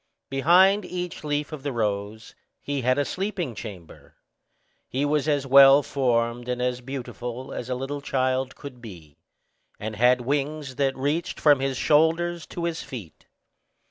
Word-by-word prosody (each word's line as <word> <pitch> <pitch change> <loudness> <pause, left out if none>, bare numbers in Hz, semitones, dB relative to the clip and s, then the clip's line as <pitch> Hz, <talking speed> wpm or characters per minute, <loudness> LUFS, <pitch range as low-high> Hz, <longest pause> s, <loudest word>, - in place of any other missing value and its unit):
Behind 185 +9 +5
each 180 -2 -5
leaf 150 0 -2
of 155 -3 -7
the 140 +1 -3
rose 105 -1 -3 0.3
he 140 -1 -3
had 130 +2 +2
a 145 - +1
sleeping 185 - -3
chamber. 100 -7 -10 0.7
He 135 +3 -1
was 150 0 0
as 145 -2 +1
well 135 +1 +8
formed 120 -3 0
and 125 0 -2
as 125 0 -1
beautiful 125 -1 -6
as 125 - -6
a 125 - -1
little 135 +3 -4
child 130 -1 -1
could 130 -4 -10
be, 85 -10 -12 0.6
and 110 +1 -5
had 125 +3 +4
wings 140 +1 -2
that 135 -1 0
reached 145 +5 -2
from 145 -3 +5
his 135 -1 -1
shoulders 165 +3 +2
to 170 - -6
his 170 -1 -2
feet. 105 - -10
135 Hz, 155 wpm, -25 LUFS, 125-150 Hz, 0.7 s, well